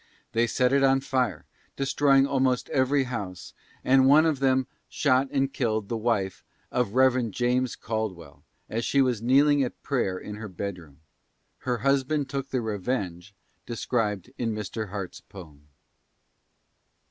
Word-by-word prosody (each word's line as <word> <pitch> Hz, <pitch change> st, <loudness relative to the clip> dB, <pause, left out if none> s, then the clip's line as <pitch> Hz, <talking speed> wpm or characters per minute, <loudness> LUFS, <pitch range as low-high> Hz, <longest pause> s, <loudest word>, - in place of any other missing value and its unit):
They 115 Hz, +1 st, +2 dB
set 125 Hz, +3 st, +1 dB
it 140 Hz, -, +4 dB
on 135 Hz, 0 st, +4 dB
fire, 130 Hz, -3 st, -1 dB, 0.3 s
destroying 135 Hz, 0 st, +3 dB
almost 130 Hz, -2 st, 0 dB
every 135 Hz, +1 st, +2 dB
house, 105 Hz, -8 st, -6 dB, 0.3 s
and 130 Hz, 0 st, +5 dB
one 150 Hz, +4 st, +6 dB
of 155 Hz, -4 st, +1 dB
them 130 Hz, -1 st, +2 dB, 0.2 s
shot 135 Hz, -2 st, +2 dB
and 135 Hz, 0 st, 0 dB
killed 110 Hz, -5 st, -1 dB
the 115 Hz, -, -1 dB
wife 110 Hz, -4 st, -1 dB, 0.3 s
of 125 Hz, -3 st, -1 dB
Rev. 130 Hz, -2 st, +3 dB
James 125 Hz, +3 st, 0 dB
Caldwell, 100 Hz, -9 st, -5 dB, 0.3 s
as 115 Hz, +2 st, -3 dB
she 140 Hz, -, +1 dB
was 125 Hz, -5 st, +2 dB
kneeling 140 Hz, +4 st, +4 dB
at 125 Hz, -, -6 dB
prayer 120 Hz, -9 st, -1 dB
in 105 Hz, +2 st, -7 dB
her 105 Hz, -1 st, -7 dB
bedroom. 90 Hz, -6 st, -7 dB, 0.6 s
Her 125 Hz, -1 st, -1 dB
husband 140 Hz, +1 st, +1 dB
took 140 Hz, 0 st, -3 dB
the 130 Hz, -, -1 dB
revenge 100 Hz, -4 st, -3 dB, 0.3 s
described 115 Hz, -3 st, -2 dB
in 115 Hz, -3 st, -1 dB
Mr. 105 Hz, 0 st, -5 dB
Harte's 100 Hz, -2 st, -6 dB
poem. 75 Hz, -7 st, -14 dB
125 Hz, 145 wpm, -26 LUFS, 105-135 Hz, 0.6 s, one